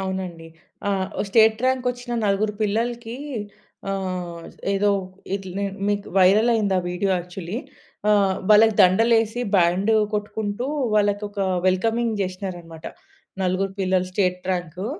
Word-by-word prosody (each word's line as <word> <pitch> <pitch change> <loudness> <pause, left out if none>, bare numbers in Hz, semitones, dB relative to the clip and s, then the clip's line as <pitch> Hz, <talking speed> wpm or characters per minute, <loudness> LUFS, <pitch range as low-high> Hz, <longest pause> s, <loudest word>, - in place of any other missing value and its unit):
అవునండి. 185 -4 -4 0.4
ఆ! - - +2 0.3
వ - - +1
స్టేట్ 220 +1 +4
ర్యాంక్ 260 -1 0
ఒచ్చిన 245 0 -7
నలుగురు 205 +2 +1
పిల్లలకి 230 +2 -2 0.7
ఆహ్, 180 -3 -4 0.3
ఏదో 200 +1 +2 0.5
ఇట్లా 195 -2 -5
నే 200 - -1 0.2
మీకు 205 0 -1
వైరల్ 200 +5 +5
అయింది 205 -4 +1
ఆ - - +3
వీడియో 185 +2 -1
యాక్చువల్లీ. 180 +2 -6 0.5
ఆహ్, 195 -2 +3
వాళ్ళకి 215 +1 +7
దండలేసి 225 +4 +4 0.2
బ్యాండ్ 180 +4 +3 0.2
కొట్టుకుంటూ 210 +2 -3 0.3
వాళ్ళకొక 205 0 0 0.3
వెల్కమింగ్ 225 +4 +1
జేషీనరన్నమాట. 180 -4 -5 0.6
నలుగురు 185 +1 0
పిల్లలు 185 -1 +1
స్టేట్ 180 -1 0
ర్యాంకు. 180 +1 -3
200 Hz, 120 wpm, -23 LUFS, 185-220 Hz, 0.7 s, వాళ్ళకి